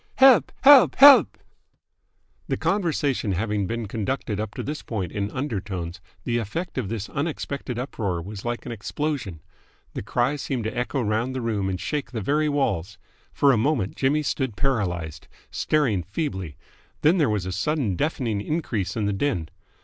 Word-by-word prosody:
"Help! 260 - +6
Help! 275 -2 +8
Help!" 280 0 +8 1.1
The - - -1
conversation 145 - 0
having 105 +1 -1
been 115 0 -3
conducted 105 0 -3
up 110 -1 -4
to - - -4
this 150 +2 -4
point 95 -7 -4
in 100 0 -2
undertones, 95 - -4 0.2
the 120 0 0
effect 135 - -4
of 105 -7 -3
this 110 -2 -4
unexpected 140 -4 -4
uproar 110 - -3
was 100 +4 -8
like 120 0 -3
an - - -5
explosion. 115 - -4 0.5
The - - -4
cries 125 +7 0
seemed 130 -5 -2
to 110 - -4
echo 125 +3 -1
round 115 +5 -1
the 130 - -2
room 105 -4 -1
and 90 -1 -3
shake 140 - -3
the 115 - -2
very 150 +8 +1
walls. 100 - -1 0.3
For 140 - +4
a 125 - +3
moment 115 -4 0
Jimmy 145 +3 +1
stood 130 -6 -2
paralysed, 90 - -2 0.2
staring 130 -11 +1
feebly; 95 - -4 0.4
then 170 +5 +4
there 145 -6 +3
was 105 -4 -1
a 95 - -3
sudden 110 - -1
deafening 120 - -1
increase 120 - -2
in 105 - 0
the 100 - 0
din. 95 - -1
115 Hz, 165 wpm, -24 LUFS, 100-145 Hz, 1.1 s, Help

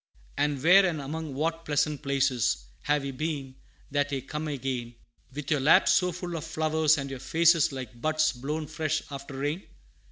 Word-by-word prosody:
"And 145 -2 0
where, 185 +4 +7
and 175 -5 0
among 150 +1 -5
what 165 +3 -1
pleasant 145 -1 0
places, 130 - +1 0.2
Have 145 -1 +1
ye 135 - -3
been, 140 -2 -4 0.4
that 145 0 0
ye 135 -1 -1
come 150 +4 -5
again 130 -4 -4 0.4
With 145 +2 -6
your 150 - +3
laps 140 +4 +5
so 180 -1 +3
full 175 0 -5
of 160 - -4
flowers, 160 -1 +2
and 140 -1 -4
your 135 - -6
faces 165 +2 +3
Like 125 -3 -8
buds 155 +1 +2
blown 150 +5 -4
fresh 155 0 -2
after 140 -1 -7
rain?" 145 +6 -2
150 Hz, 180 wpm, -28 LUFS, 135-160 Hz, 0.4 s, where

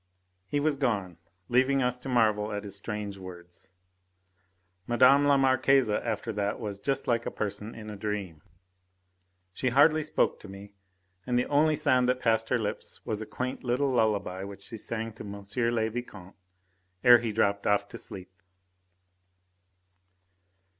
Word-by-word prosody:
He 145 - -1
was 145 -1 +1
gone, 100 - -1 0.3
leaving 130 +2 +3
us 125 0 0
to 135 - -7
marvel 110 -3 +2
at 105 0 -4
his 100 -1 -5
strange 100 -1 -5
words. 90 -1 -12 1.2
Mme. 120 0 -2 0.3
la 140 -1 +5
Marquise 135 -2 +3
after 115 +2 -2
that 100 0 -2
was 105 -4 -5
just 135 +4 -1
like 120 -1 0
a - - 0
person 105 +1 -5
in 110 -1 -8
a - - -7
dream. 100 -6 -4 1.1
She 125 +7 -1
hardly 150 +5 +5
spoke 155 - 0
to - - -12
me, 100 +1 -11 0.5
and 125 -1 +1
the 125 - +2
only 150 +2 +3
sound 130 -4 +2
that 125 0 +1
passed 115 -2 +1
her 125 - +2
lips 105 -3 -5
was 110 -1 -2
a 110 - -6
quaint 130 +1 -4
little 130 +3 +1
lullaby 105 -6 0
which 100 0 -9
she 115 - -7
sang 115 +1 -4
to 110 - -10
M. 100 -1 -8 0.3
le 110 -1 +1
Vicomte 105 -6 -8 0.7
ere 120 -1 +8
he 115 -1 -3
dropped 100 -2 +1
off 100 0 +2
to - - -9
sleep. 95 -1 -7
110 Hz, 160 wpm, -28 LUFS, 100-125 Hz, 1.2 s, ere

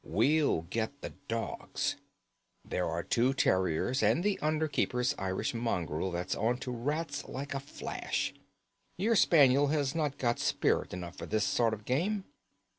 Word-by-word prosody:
We'll 150 - +2
get 110 +10 -3
the - - -5 0.2
dogs. 115 0 -2 0.7
There 90 -2 -1
are 85 +1 -2
the - - -23
two 125 +3 +3
terriers 95 - +2
and 170 - +3
the 205 -1 +1
under 155 +1 +1
keeper's 125 -3 0
Irish 95 +3 -1
mongrel 95 -8 -1
that's 85 0 -2
on 120 +2 +1
to 125 - -3
rats 145 +7 -2
like 140 +2 -5
a 135 - -1
flash. 140 - -3 0.6
Your 220 +5 +2
spaniel 145 -7 +5
has 145 -2 +1
not 150 -4 -1
got 120 -2 0
spirit - - +1
enough 90 -1 -6
for - - -6
this 110 -1 +1
sort 115 -2 +2
of 105 0 -16
game." 185 +10 0
125 Hz, 160 wpm, -31 LUFS, 100-150 Hz, 0.7 s, spaniel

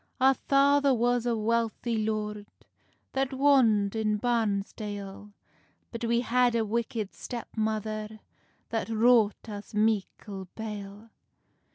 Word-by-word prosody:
"Our 265 +1 +6
father 280 0 +3
was 245 0 +1
a 235 - +1
wealthy 230 +1 0
lord, 210 -1 -2 0.7
That 270 0 0
wond 235 -8 +4
in 215 -1 +1
Barnsdale; 205 -3 -2 0.6
But 235 0 -4
we 235 +1 +2
had 245 0 +2
a 225 -1 +1
wicked 220 -1 -2
step 240 -2 -7
mother, 215 0 -2 0.5
That 225 -1 -2
wrought 225 -1 +3
us 205 -1 -8
meickle 205 -2 -1
bale. 210 0 -7
220 Hz, 110 wpm, -28 LUFS, 210-240 Hz, 0.7 s, Our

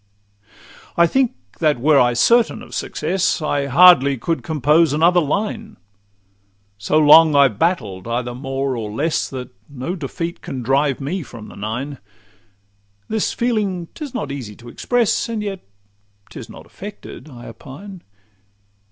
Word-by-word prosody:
I 170 - +6
think 260 +7 +1 0.2
that 155 -6 +2
were 145 +2 +4
I 120 -1 +3
certain 230 - +3
of - - -13
success, 175 +5 -1
I 145 -3 -1
hardly 140 -2 +6
could 165 +7 -2
compose 155 0 +2
another 170 +4 +4
line: 210 +7 -3 1.0
So 145 +9 +1
long 155 0 +7
I've 135 -7 +4
battled 110 - -1
either 120 +1 -2
more 135 +1 -3
or 110 -3 -4
less, 145 +10 -1
That 130 -2 -7 0.2
no 145 +6 -5
defeat 165 +2 -5
can 130 -2 -6
drive 135 +2 +1
me 170 +8 -3
from 115 -7 -11
the - - -13
Nine. 125 +7 -5 1.1
This 220 -1 0
feeling 205 -8 -1
'tis 300 -4 -7
not 155 - -3
easy 120 -7 -7
to 120 +2 -13
express, 240 - 0
And 220 -2 -3
yet 195 -2 -4 0.7
'tis - - -9
not - - -12
affected, 150 - -10
I 120 -3 -12
opine. 155 - -11
150 Hz, 145 wpm, -20 LUFS, 130-180 Hz, 1.1 s, long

